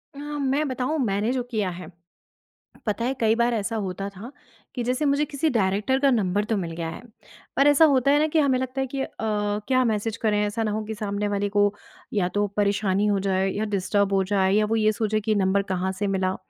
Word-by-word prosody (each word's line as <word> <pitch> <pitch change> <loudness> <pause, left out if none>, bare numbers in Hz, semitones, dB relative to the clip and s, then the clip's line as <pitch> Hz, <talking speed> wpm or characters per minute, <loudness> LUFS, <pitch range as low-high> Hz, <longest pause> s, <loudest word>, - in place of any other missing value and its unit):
अ, - - -9
मैं 290 0 -1
बताऊँ 260 +4 -2
मैंने 205 +2 0
जो 260 - 0
किया 210 -5 0
है। 180 0 -8 1.0
पता 220 +1 -1
है 260 - 0
कई 225 -1 +3
बार 235 +1 +2
ऐसा 225 0 -2
होता 195 -2 -3
था 200 +6 -10 0.4
कि 245 - -2
जैसे 255 +5 0
मुझे 285 +1 +2
किसी 295 +2 -1
डायरेक्टर 210 +2 +1
का 280 0 +4
नंबर 205 -4 +1
तो 220 - 0
मिल 170 -4 -3
गया 165 -1 -3
है, 165 - -8 0.5
पर 275 - +4
ऐसा 290 +2 +6
होता 275 -2 +3
है 290 - +4
ना 310 - +3
कि 315 +1 +1
हमें 275 -4 +3
लगता 260 +1 -3
है 265 - -1
कि 270 +1 -4
अ, - - -2
क्या 210 +4 0
मैसेज 220 0 -1
करें 215 -2 +1
ऐसा 210 +2 -1
ना 215 - -1
हो 215 +1 -2
कि 220 - -4
सामने 205 0 -2
वाले 205 0 -1
को 205 0 +2 0.4
या 195 -4 +1
तो 205 - +3
परेशानी 200 -1 +1
हो 205 -1 +2
जाए 190 0 0
या 210 +3 -2
डिस्टर्ब 200 +1 +1
हो 195 0 +3
जाए 190 -1 +3
या 210 +1 +3
वो 220 +2 0
ये 215 -1 +3
सोचे 215 0 -1
कि 215 0 0
नंबर 195 0 +2
कहाँ 185 +1 -1
से 205 - 0
मिला। 190 -1 0
215 Hz, 235 wpm, -24 LUFS, 200-255 Hz, 1.0 s, ऐसा